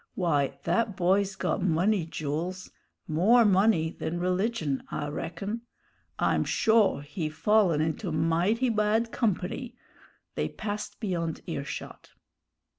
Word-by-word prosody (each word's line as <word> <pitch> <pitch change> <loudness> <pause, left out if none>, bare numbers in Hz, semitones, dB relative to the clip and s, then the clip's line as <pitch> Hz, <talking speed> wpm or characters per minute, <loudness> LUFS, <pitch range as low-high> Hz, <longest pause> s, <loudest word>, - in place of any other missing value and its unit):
Why, 145 -7 +1
that 225 -4 0
boy's 195 +2 +2
got - - -1
money, 180 +1 +2
Jools; 165 +5 -4 0.4
more 210 +10 +4
money 195 -5 +3
than 165 +1 -4
religion, 180 - 0
I 145 - -3
reckon. 195 +9 -4 0.6
I'm - - +2
shore 220 -10 +3
he 155 +2 -4
fallen 170 0 +3
into 160 +4 -2
mighty 170 +10 +1
bad 220 +1 +1
company 230 +3 -2 0.3
" - - -30
they - - -1
passed 210 -1 -5
beyond 170 -7 -2
earshot. 140 -4 -6
185 Hz, 115 wpm, -28 LUFS, 160-215 Hz, 0.6 s, more